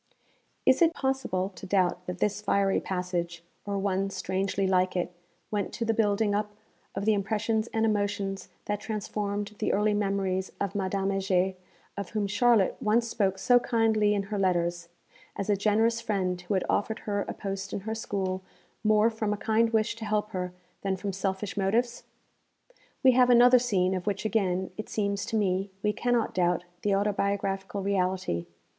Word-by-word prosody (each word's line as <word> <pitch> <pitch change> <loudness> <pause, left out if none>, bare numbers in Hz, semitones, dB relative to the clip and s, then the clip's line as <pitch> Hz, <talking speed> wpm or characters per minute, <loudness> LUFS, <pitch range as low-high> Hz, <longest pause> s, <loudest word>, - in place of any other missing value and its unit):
Is 260 +4 +4
it 335 0 +5
possible 265 -9 -1
to 190 0 -11
doubt 180 -2 +1
that 180 -1 -4
this 205 +2 0
'fiery 200 -1 +2
passage,' 175 -2 -3 0.2
or 200 0 -1
one 195 0 0
strangely 195 +1 -1
like 185 0 +2
it 180 0 -1 0.4
went 205 -2 -1
to 235 - -2
the 225 - +2
building 210 -1 +2
up 210 0 -2 0.4
of 195 +1 -2
the 220 - +4
impressions 215 +2 0
and 225 -1 +1
emotions 205 -2 -1 0.2
that 205 -1 -1
transformed 205 -1 -3
the - - +1
early 210 +1 +2
memories 195 -2 -1
of 200 -1 -2
Madame 195 -1 -1
Heger, 190 -1 +1 0.4
of 200 -2 -5
whom 210 -2 -1
Charlotte 205 0 +3
once 230 +1 +2
spoke 195 -4 0
so 245 +5 +5
kindly 220 -3 +2
in 200 - 0
her 205 - 0
letters, 175 -2 0 0.5
as 200 +1 -1
a - - +4
generous 220 +3 +2
friend 185 -5 -1
who 180 +3 -2
had 185 - 0
offered 220 +2 0
her 205 -1 -1
a - - -3
post 195 -1 -4
in - - -3
her 220 +3 -3
school 190 -4 -2 0.4
more 215 +1 +4
from 220 -2 -2
a - - -3
kind 225 +2 +2
wish 220 0 +1
to 225 - -6
help 210 0 -1
her 180 -2 -3 0.3
than 195 -1 0
from 195 +1 -4
selfish 190 +1 -2
motives? 225 +5 0 1.0
We 260 - +8
have 250 0 +4
another 245 +1 +7
scene 190 -6 +1
of 185 +1 -4
which 200 +1 -1
again, 190 -4 0
it 215 - -6
seems 200 -1 -1
to - - -2
me, 195 -2 +1
we 210 0 +2
cannot 245 -1 0
doubt 175 -1 +1 0.2
the 205 -1 +2
autobiographical 200 -1 -1
reality. 185 - 0
200 Hz, 175 wpm, -28 LUFS, 190-215 Hz, 1.0 s, We